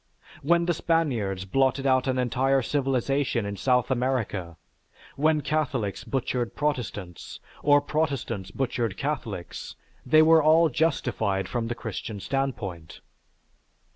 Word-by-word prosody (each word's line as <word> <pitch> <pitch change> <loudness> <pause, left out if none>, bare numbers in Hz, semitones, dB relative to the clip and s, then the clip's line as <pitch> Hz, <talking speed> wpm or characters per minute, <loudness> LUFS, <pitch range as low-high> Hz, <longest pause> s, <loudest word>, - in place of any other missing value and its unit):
When 170 +3 +3
the 175 - +2
Spaniards 120 - 0
blotted 135 +5 +1
out 130 -1 +3
an 130 -1 0
entire 130 +2 +1
civilization 135 -3 0
in 100 0 -4
South 125 +3 +1
America, 120 -9 -1 0.6
when 155 +1 +2
Catholics 130 - -1
butchered 125 -2 -2
Protestants, 120 - -4 0.2
or 145 0 +5
Protestants 140 - -2
butchered 115 -3 -2
Catholics, 120 - -4 0.3
they 155 +5 +5
were 160 0 +6
all 160 +2 +5
justified 120 - 0
from 120 -2 -2
the 120 - -3
Christian 110 -2 -6
standpoint. 105 - -4
130 Hz, 115 wpm, -26 LUFS, 110-145 Hz, 0.6 s, were